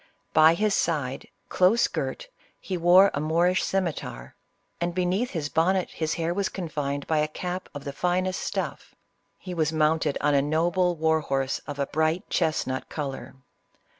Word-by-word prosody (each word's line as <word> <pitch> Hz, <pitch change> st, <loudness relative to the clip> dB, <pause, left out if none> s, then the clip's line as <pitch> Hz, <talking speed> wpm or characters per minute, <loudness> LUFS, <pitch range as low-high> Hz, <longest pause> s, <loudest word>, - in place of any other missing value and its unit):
By 160 Hz, +1 st, +6 dB
his 210 Hz, +3 st, +1 dB
side, 145 Hz, -8 st, -1 dB, 0.2 s
close 190 Hz, +6 st, +3 dB
girt, -, -, -4 dB, 0.3 s
he 190 Hz, -, -4 dB
wore 180 Hz, +3 st, +6 dB
a -, -, -1 dB
Moorish 170 Hz, +4 st, +2 dB
scimiter, 165 Hz, -, -3 dB, 0.5 s
and 175 Hz, 0 st, -2 dB
beneath 185 Hz, +7 st, 0 dB
his 160 Hz, -8 st, -3 dB
bonnet 180 Hz, +5 st, +1 dB
his 155 Hz, -1 st, -2 dB
hair 170 Hz, 0 st, -1 dB
was 195 Hz, +1 st, -1 dB
confined 145 Hz, -6 st, -3 dB
by 160 Hz, -1 st, +1 dB
a 150 Hz, -, +1 dB
cap 180 Hz, +4 st, -5 dB
of 145 Hz, -, -6 dB
the 140 Hz, -1 st, -5 dB
finest 185 Hz, +4 st, 0 dB
stuff. -, -, -4 dB, 0.4 s
He 185 Hz, -, -7 dB
was 160 Hz, -3 st, 0 dB
mounted 155 Hz, -1 st, +1 dB
on 150 Hz, 0 st, +2 dB
a 140 Hz, -, +4 dB
noble 175 Hz, +4 st, +1 dB
war 160 Hz, 0 st, +2 dB
horse 135 Hz, -3 st, -1 dB
of 145 Hz, -1 st, -5 dB
a 140 Hz, -, 0 dB
bright 160 Hz, +4 st, 0 dB
chestnut 130 Hz, -4 st, -1 dB
color." 140 Hz, -3 st, -5 dB
160 Hz, 165 wpm, -26 LUFS, 150-180 Hz, 0.5 s, By